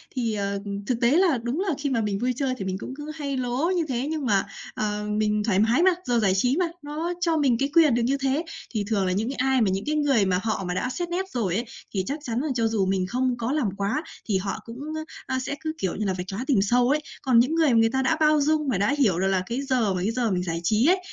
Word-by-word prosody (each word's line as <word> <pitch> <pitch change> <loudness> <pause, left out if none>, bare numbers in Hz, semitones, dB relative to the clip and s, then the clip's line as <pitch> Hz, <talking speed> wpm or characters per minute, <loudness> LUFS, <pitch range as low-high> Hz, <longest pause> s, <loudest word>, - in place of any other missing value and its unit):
Thì, 230 -3 0
ờ, 200 -1 -2
ừm, 200 0 -5
thực 240 +2 -1
tế 235 +2 +4
là 335 -4 +4
đúng 250 +8 -2
là 385 -5 0
khi 285 -1 -2
mà 235 -4 +1
mình 205 -2 -1
vui 250 +2 0
chơi 265 0 -1
thì 195 - -5
mình 190 0 -2
cũng 255 - -7
cứ 300 +1 -6
hay 280 -3 -3
lố 255 +8 0
như 340 -2 +1
thế, 255 +1 -2
nhưng 310 -3 -2
mà, 200 -5 +2 0.3
ờ, 210 -1 -2
mình 210 -1 +1
thoải 200 -3 +2
mái 235 +10 +3
mà, 375 - +6
giờ 240 -1 +1
giải 195 -4 +3
trí 250 +8 +2
mà, 360 - +2 0.2
nó 310 +4 -3
cho 330 -2 +2
mình 265 -5 +3
cái 275 - +1
quyền 315 -7 +6
được 240 - +1
như 275 +3 +1
thế. 275 +4 0 0.3
Thì 215 -3 -1
thường 200 -4 +1
là 185 - 0
những 215 +6 -1
ai 265 -1 +2
mà 210 - +3
những 190 +1 -2
cái 305 +1 0
người 275 -8 +3
mà 185 -1 +1
họ 220 -3 -1
mà 180 - -1
đã 250 +7 -1
xét 345 +5 -3
nét 380 +2 -2
rồi 200 - -1
ấy 235 +3 -1 0.3
thì 190 -2 -1
chắc 285 +3 -3
chắn 235 -2 -2
là 305 - -2
cho 230 -1 +2
dù 215 -3 +1
mình 190 -1 0
không 250 +3 0
có 235 +2 -2
làm 285 -8 +1
quá 205 +10 -1 0.2
thì 200 -4 +1
họ 195 +1 -3
cũng, 230 +1 -9 0.3
a, 390 -7 -6
a, 260 - 0
sẽ 280 +2 -3
cứ, 315 -1 -3
kiểu 190 - -2
như 210 - -2
là, 190 - 0
vạch 180 +1 -5
lá 200 - -4
tìm 240 -9 +3
sâu 245 +5 +3
ấy. 300 +2 +3 0.2
Còn 250 -4 +4
những 275 +7 +2
người 320 -3 +4
mà 225 - +5
người 225 0 +4
ta 265 +1 0
đã 315 +5 +2
bao 305 -1 +4
dung 305 0 +1
và 235 - +1
đã 205 +5 +2
hiểu 195 -10 +3
được 190 - +1
là 190 -1 +1
cái 240 +6 -3
giờ 250 -8 +1
mà 180 - -2
cái 210 +4 0
giờ 235 -3 0
mình 180 -1 0
giải 165 -1 -2
trí 215 +7 +2
ấy, 370 +1 +4
245 Hz, 300 wpm, -25 LUFS, 205-285 Hz, 0.3 s, mà